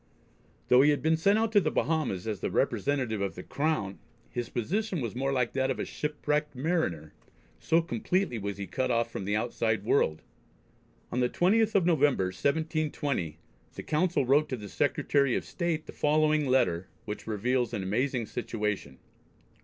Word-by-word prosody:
Though 125 +1 +6
he 145 - +5
had 145 - +1
been 160 +1 +4
sent 200 +6 +3
out 225 0 +1
to 205 -2 +5
the 155 - +1
Bahamas 140 - -1
as 110 -3 -3
the - - -2
representative 130 -7 0
of 100 -1 -2
the 90 - -7
Crown, 140 -10 -1 0.3
his 120 -2 -3
position 190 - -1
was 120 -4 -4
more 135 +2 0
like 125 -3 0
that 130 0 +1
of 130 - -1
a - - -2
shipwrecked 150 0 -2
mariner, 125 - -1 0.5
so 165 +1 +2
completely 185 - -1
was 100 0 -4
he 100 - -4
cut 130 +5 -2
off 115 -1 +1
from 95 - -5
the 105 +1 0
outside 110 -2 0
world. 80 - +1 0.9
On 125 - -1
the 125 -1 +2
20th 220 +5 +2
of 190 -4 +4
November, 145 - +3
1720, 145 - -1 0.4
the - - -6
Council 160 -2 +1
wrote 145 +4 +3
to 130 - -2
the 105 -2 -8
Secretary 140 +4 +1
of - - -2
State 170 -3 -2
the - - -10
following 155 0 +2
letter 95 -9 +2 0.2
which 105 +1 -6
reveals 120 +3 0
an 105 -5 -3
amazing 120 +5 0
situation. 105 - -3
130 Hz, 175 wpm, -29 LUFS, 110-155 Hz, 0.9 s, Though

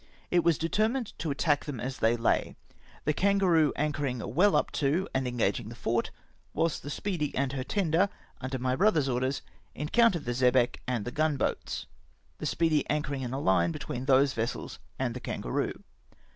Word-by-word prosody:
It 175 -1 +4
was 170 -2 +3
de 165 - -1
termined 220 +5 0
to 155 +1 -2
attack 145 +1 +1
them 145 -6 -5
as 130 +1 -4
they 115 +1 +3
lay; 115 - +1 0.5
the 150 - +2
Kangaroo 180 -5 +3
anchoring 145 -3 -1 0.2
well 190 +8 +4
up - - +1
to 155 +7 +1
and 130 -1 0
engaging 115 -2 -1
the 115 - -9
fort, 115 0 -1 0.5
whilst 165 -1 0
the 145 - -7
Speedy 155 -1 -2
and 135 0 0
her 130 -2 -2
tender 185 +2 +1 0.3
under 130 +1 -3
my 130 0 0
brother's 165 -5 +3
orders, 130 +1 -1 0.3
en 150 +2 -4
countered 230 -9 +3
the 120 - -1
xebec 125 0 +3
and 120 -5 -1
the 125 - -3
gun 155 +1 +1
boats - - -2 0.3
— - - -38
the - - -2
Speedy 160 -3 +2
anchoring 145 -2 -1
in 125 -2 -4
a 135 +2 -3 0.2
hue - - 0
between 130 -5 -5
those 135 0 +4
vessels 115 +2 -3 0.2
and 125 -3 -1
the 125 - -5
Kan - - -4
garoo. - - -2
140 Hz, 190 wpm, -29 LUFS, 125-165 Hz, 0.5 s, It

